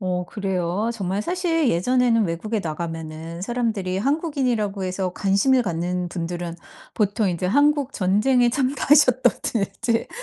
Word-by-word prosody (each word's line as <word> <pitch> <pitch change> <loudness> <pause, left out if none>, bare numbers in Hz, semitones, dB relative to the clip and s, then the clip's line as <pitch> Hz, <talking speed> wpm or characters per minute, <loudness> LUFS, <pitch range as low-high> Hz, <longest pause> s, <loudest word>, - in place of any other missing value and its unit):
어 180 -2 -2
그래요? 190 +1 -2
정말 195 -2 -2
사실 335 - 0
예전에는 230 +4 +2
외국에 205 +6 -2
나가면은 165 0 -6
사람들이 215 -4 -2
한국인이라고 250 - -1
해서 185 0 -2
관심을 210 +7 +2
갖는 175 -1 -2
분들은 170 -1 -4 0.4
보통 210 0 0
인제 175 +1 -2
한국 285 +4 +2
전쟁에 235 +6 +3
참가하셨다든지 255 -4 +2
205 Hz, 325 characters per minute, -23 LUFS, 180-250 Hz, 0.4 s, 전쟁에